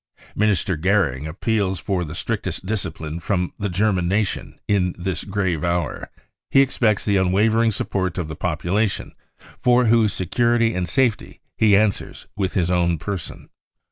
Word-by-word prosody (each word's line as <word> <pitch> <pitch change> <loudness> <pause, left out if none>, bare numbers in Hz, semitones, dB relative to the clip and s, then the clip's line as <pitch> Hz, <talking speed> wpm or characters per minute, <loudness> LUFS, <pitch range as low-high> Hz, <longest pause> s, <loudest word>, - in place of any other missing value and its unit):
Minister 100 -3 +1
Goering 80 -6 +1
appeals 95 +2 -1
for 90 +2 -1
the 80 0 -7
strictest - - -3
discipline 80 -6 -4
from 90 +1 -1
the 100 - -1
German 95 -1 +1
nation 100 +2 -2
in 90 -3 +1
this 90 0 -3
grave 95 -6 -1
hour. 85 0 -2 0.4
He 135 - +5
expects 115 -6 +1
the 100 -2 +2
unwavering 110 +5 +3
support 95 -3 -2
of 90 -4 -2
the 80 - -6
population, 90 +6 -1 0.5
for 125 0 +4
whose 110 -2 +4
security 115 +5 +1
and 90 -1 -2
safety 120 +1 0 0.2
he 105 -3 +5
answers 105 -2 -1
with 95 -2 -2
his 90 -2 +1
own 85 -1 +2
person. 90 -1 -6
95 Hz, 145 wpm, -22 LUFS, 90-110 Hz, 0.5 s, He